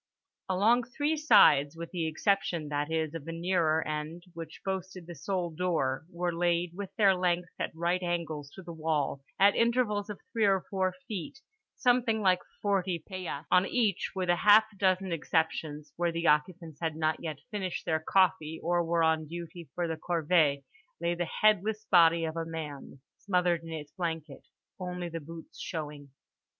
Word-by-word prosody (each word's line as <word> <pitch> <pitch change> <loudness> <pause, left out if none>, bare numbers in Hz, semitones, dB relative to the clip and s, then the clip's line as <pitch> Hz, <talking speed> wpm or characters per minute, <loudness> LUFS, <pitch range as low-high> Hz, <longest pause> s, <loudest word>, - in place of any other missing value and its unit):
Along 215 +6 +4
three 290 +6 -1
sides 155 - +5
(with 170 0 -7
the 170 -3 -1
exception, 170 -2 0
that 145 +1 -2
is, 160 -1 -1
of 165 -3 -6
the 165 - -5
nearer 165 -3 +1
end, 155 +3 -4
which 165 -1 -9
boasted 190 -2 -4
the 175 - -8
sole 175 +2 -2
door) 160 -4 -1
were 175 0 -2
laid, 170 0 +1
with 195 +1 -6
their 200 -3 +5
lengths 180 -1 0
at - - -1
right 170 +2 0
angles 165 -5 -3
to 190 - -10
the 170 -1 -8
wall, 155 -4 -1 0.2
at 200 +1 +6
intervals 230 -3 +1
of 205 - -6
three 225 -2 +2
or 195 -2 +2
four 190 -2 0
feet, 205 +2 -5 0.4
something 245 -3 +2
like 185 -3 +3 0.2
forty 190 -3 +1
paillasses. 170 -3 -6
On 180 +1 +5
each, 215 -7 0
with 185 -2 -2
half 205 +5 +6
a - - -18
dozen 190 -1 +1
exceptions 160 -2 -1
(where 170 0 +1
the 170 0 -3
occupants 160 0 +1
had 160 -2 -1
not 155 0 0
yet 155 -4 -4
finished 190 -4 -3
their 160 -1 +1
coffee 160 -2 +2
or 175 +1 +2
were 165 0 +1
on 160 -1 +2
duty 170 -1 -8
for 175 -1 -1
the 160 -1 -3
corvée) 160 -4 +3 0.4
lay 170 - 0
the 175 -1 -3
headless 215 +1 +3
body 170 -2 +6
of 160 0 -4
a 165 - -2
man 150 -4 -7 0.2
smothered 180 -3 +1
in 165 - -10
its 150 -2 -6
blanket, 160 -5 -5 0.3
only 180 -1 -4
the 165 0 -5
boots 165 +2 -11
showing. 150 -3 -6
170 Hz, 175 wpm, -30 LUFS, 160-190 Hz, 0.4 s, at